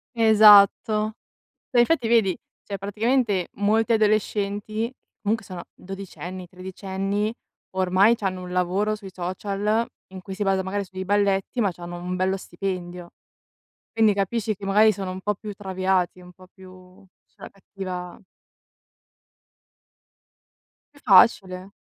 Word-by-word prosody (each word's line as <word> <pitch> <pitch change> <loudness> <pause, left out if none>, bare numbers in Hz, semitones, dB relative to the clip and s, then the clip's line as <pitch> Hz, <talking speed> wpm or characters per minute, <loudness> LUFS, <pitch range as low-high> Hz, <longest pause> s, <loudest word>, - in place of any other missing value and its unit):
Esatto! 215 -1 +6 0.5
Ma 245 - +2
infatti 240 0 +3
vedi, 220 -6 +3 0.3
cioè 200 -1 -6
praticamente 210 -1 0
molti 220 +3 +2
adolescenti, 215 +1 0 0.3
comunque 220 +1 -1
sono 180 -3 -8
dodicenni, 185 -1 -8
tredicenni, 195 +3 -3 0.4
ormai 190 +4 +4
c'hanno 190 -4 -3
un 180 0 -8
lavoro 185 +4 0
sui 200 -3 -11
social 200 +5 -1 0.2
in 190 -1 -10
cui 195 +1 -8
si 200 - -9
basa 195 -1 +1
magari 200 +2 -2
sui 190 0 -15
dei 190 - -3
balletti 200 +3 +1
ma 200 -3 +2
c'hanno 175 0 -8
un 180 +1 -4
bello 190 +1 0
stipendio. 180 -1 -6 0.8
Quindi 220 -2 +3
capisci 215 +2 -1
che, 195 - -11
magari, 210 +3 +5
sono 190 -2 -5
un 185 +1 -6
po' 210 +2 -1
più 210 +1 -8
traviati, 190 -2 -1
un 180 0 -14
po' 185 +1 -17
più 185 -1 -16 0.2
sulla - - -13
cattiva 185 -2 -8 2.8
È 285 - -19
facile. 190 -2 +4
195 Hz, 130 wpm, -24 LUFS, 185-215 Hz, 2.8 s, Esatto